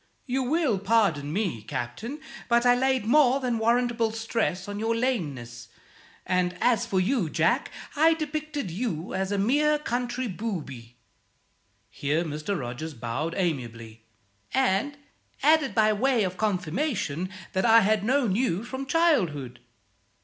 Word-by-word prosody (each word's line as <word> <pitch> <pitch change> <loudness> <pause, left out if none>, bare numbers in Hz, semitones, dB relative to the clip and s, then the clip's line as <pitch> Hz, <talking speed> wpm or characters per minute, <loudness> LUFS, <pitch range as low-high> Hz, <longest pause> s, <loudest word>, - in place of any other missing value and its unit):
You 265 0 -1
will 265 - +1
pardon 195 -9 +1
me, 180 - -1
Captain, 120 - -5 0.3
but 235 0 +3
I 245 - +6
laid 260 -2 +1
more 270 +2 +4
than 245 -4 -1
warrantable 235 0 +1
stress 225 -5 -2
on 205 0 -5
your 225 +1 0
lameness; 140 - -3 0.6
and 180 0 0
us 245 -4 +2
for 190 - +1
you, 190 - +1
Jack, - - +1 0.3
I 320 +2 +5
depicted 305 - -4
you 180 -4 -3
as 190 +1 -2
a 205 - 0
mere 295 +9 +3
country 250 -2 -2
booby" 150 - -6 0.9
here 145 +7 -1
Mr. 155 +4 -3
Rogers 135 +5 -6
bowed 120 +8 -3
amiably 115 - -3 0.5
"and 265 +2 +1 0.5
added 305 -1 +3
by 215 -1 +4
way 245 +1 +2
of 185 -1 -2
confirmation 185 - -1 0.2
that 190 - +1
I 230 -1 +7
had 210 0 +2
known 245 -4 +2
you 220 -5 0
from 265 +3 -6
childhood. 175 - +1
215 Hz, 135 wpm, -26 LUFS, 165-255 Hz, 0.9 s, I